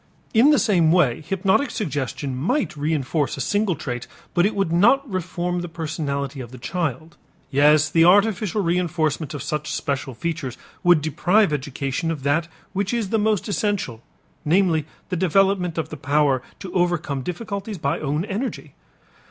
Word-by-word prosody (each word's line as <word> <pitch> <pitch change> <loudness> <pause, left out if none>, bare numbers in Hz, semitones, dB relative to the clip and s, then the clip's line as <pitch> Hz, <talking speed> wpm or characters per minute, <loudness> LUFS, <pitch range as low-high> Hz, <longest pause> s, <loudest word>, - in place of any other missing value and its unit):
In 240 +5 +6
the 300 - +5
same 190 -8 +3
way 155 -9 +3
hypnotic 195 - +1
suggestion 140 - -3
might 185 - 0
reënforce 150 -1 -1
a - - -6
single 205 - +1
trait 125 -5 -5 0.3
but 175 +3 +3
would 195 -6 -1
not 240 +10 +4
reform 180 -2 -2
the 175 - -5
personality 145 -4 -3
of 120 - -8
the 130 - -11
child. 160 +2 -3 0.3
Yes, 150 +2 +5
the 165 +1 +3
artificial 205 +2 +3
reënforcement 165 -4 0
of 140 - -5
such 150 +1 -3
special 140 -2 -3
features 155 -4 -4 0.3
would 175 -4 +5
deprive 175 +4 +2
education 140 +3 -2
of 155 -5 -3
that 150 +4 +1 0.3
which 200 +3 -1
is 225 -5 -1
the 225 - +1
most 210 -1 +1
essential, 200 - -1 0.4
namely, 160 -2 +2 0.2
the 185 - -1
development 185 0 +2
of 160 -1 -2
the 155 - -7
power 140 -2 +2 0.2
to 185 - -7
overcome 175 -6 0
difficulties 200 - -5
by 140 -3 -1
own 150 +4 -1
energy. 215 +6 -4
165 Hz, 155 wpm, -23 LUFS, 145-195 Hz, 0.4 s, In